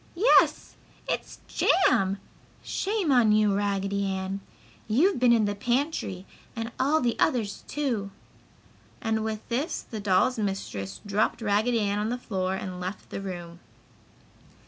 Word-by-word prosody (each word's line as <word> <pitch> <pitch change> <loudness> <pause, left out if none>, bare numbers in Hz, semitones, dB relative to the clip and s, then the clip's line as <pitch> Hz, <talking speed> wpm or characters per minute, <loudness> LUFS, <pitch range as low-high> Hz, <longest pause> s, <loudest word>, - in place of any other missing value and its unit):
"Yes! 410 +8 +4 0.3
It's - - -4
JAM! 205 - +3 0.5
Shame 395 -6 -1
on 240 -5 +5
you, 210 -1 +4
Raggedy 200 0 0
Ann! 190 0 -3 0.5
You've 285 - +3
been 245 -1 +5
in 225 -2 +4
the 205 - 0
pantry 240 - -1 0.3
and 230 0 -4
all 295 +4 +3
the 240 -1 +1
others, 220 -6 0
too!" 240 -9 -2 0.9
and 220 -1 -1
with 220 -1 -4
this 275 +8 -1
the 220 - -7
dolls' 205 +5 +2
mistress 190 - -3
dropped 205 +1 +1
Raggedy 220 +2 +1
Ann 205 0 0
on 210 +1 -1
the 245 - -1
floor 190 -6 -2
and 185 -1 -5
left 185 +3 -6
the - - -4
room. 175 -3 -7
215 Hz, 140 wpm, -27 LUFS, 195-245 Hz, 0.9 s, on